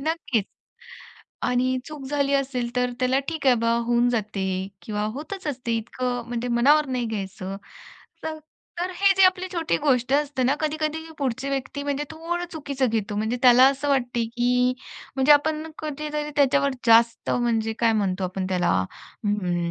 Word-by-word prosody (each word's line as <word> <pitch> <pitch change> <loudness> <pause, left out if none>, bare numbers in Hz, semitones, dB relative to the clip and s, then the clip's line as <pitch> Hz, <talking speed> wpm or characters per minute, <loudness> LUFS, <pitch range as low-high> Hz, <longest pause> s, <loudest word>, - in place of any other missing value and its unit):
नक्कीच. 300 - -1 1.0
आणि 255 +1 +1
चूक 300 -2 -8
झाली 280 0 0
असेल, 255 -3 -1
तर 250 0 +1
त्याला, 255 +1 +2
"ठीक 315 -4 -3
आहे 255 - +7
बा, 230 0 +2
होऊन 240 0 +3
जाते." 210 -4 -2 0.4
किंवा 210 +2 -3
"होतच 370 +5 -7
असते 245 -5 -2
इतकं 245 +2 -3
म्हणजे 240 0 -3
मनावर 285 +6 +4
नाही 250 -3 -2
घ्यायचं." 195 -2 -5 0.7
तर 315 0 -4 0.4
तर 365 +1 -1
हे 390 +2 +4
जे 385 - +5
आपली 370 0 +3
छोटी 330 -2 0
गोष्ट 260 -3 +2
असते 285 -2 0
ना, 270 +3 +3
कधी-कधी 310 0 -1 0.2
पुढची 270 -1 -2
व्यक्ती 275 +1 -3
म्हणजे 285 0 -2
थोडं 340 +2 -3
चुकीचं 280 -4 -1
घेतो. 210 -2 -2
म्हणजे 220 +3 -1
त्याला 250 +1 +8
असं 275 +1 +1
वाटते, 245 -3 +1
की 250 +2 +1 0.4
म्हणजे 270 +3 +6
आपण 310 +2 +1
कधीतरी 300 0 -4
त्याच्यावर 280 0 +3
जास्त 230 0 +4
म्हणजे 225 -2 +1
काय 230 -1 +3
म्हणतो 195 -3 0
आपण 185 +1 -3
त्याला 180 -2 +1 0.5
अम्म, 180 -4 0
255 Hz, 160 wpm, -24 LUFS, 230-295 Hz, 1.0 s, त्याला